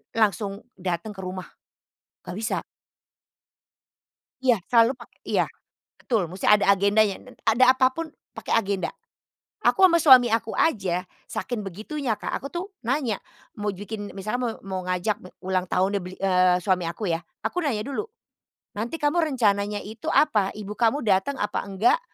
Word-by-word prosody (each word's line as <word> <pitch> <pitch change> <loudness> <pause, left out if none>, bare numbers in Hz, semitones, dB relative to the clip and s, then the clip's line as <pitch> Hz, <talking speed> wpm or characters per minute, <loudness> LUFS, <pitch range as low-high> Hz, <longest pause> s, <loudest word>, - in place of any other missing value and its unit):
langsung 205 -2 +1 0.2
datang 180 +2 -3
ke 190 - -6
rumah, 185 0 -6 0.8
nggak 180 +2 -6
bisa. 225 +2 -2 1.8
Iya, 250 -3 +4 0.2
selalu 235 +2 +5
pakai 240 0 -16
iya, - - +3 0.5
betul. 210 -9 -1
Musti 185 +2 -5
ada 205 -1 +5
agendanya 200 +1 +4
dan 255 - -15
ada 255 +3 +5
apa 255 0 +4
pun 330 +5 -5 0.3
pakai - - -3
agenda. 195 -3 -2 0.7
Aku - - +3
sama 340 - +4
suami 260 -6 +8
aku 225 0 0
aja 185 - 0 0.2
saking 235 -4 -4
begitunya 220 - -3
Kak, - - -2
aku 275 - -7
tuh 345 +1 -3 0.2
nanya 250 -3 0 0.4
mau 210 -1 -2
jukin 205 +1 -7
misalnya 205 +5 -3
mau 230 - -1
mau 190 -1 -4
ngajak 185 +3 0
me 185 - -12
ulang 185 -1 0
tahun 190 +2 +1
deh 195 - -2
beli, 185 +1 -8
eee, 180 -1 +3
suami 180 -1 +1
aku 175 +4 -3
ya, 165 0 -1 0.2
aku 335 +11 -2
nanya 245 -8 0
dulu, 280 +9 -2 0.7
"Nanti 230 +9 -4
kamu 310 +2 +1
rencananya 210 -9 +1
itu 220 +2 -9
apa? 215 -11 +3
Ibu 210 0 -7
kamu 245 +5 +2
datang 205 +6 +2
apa 210 - -2
nggak? 210 - +3
210 Hz, 160 wpm, -25 LUFS, 190-245 Hz, 1.8 s, suami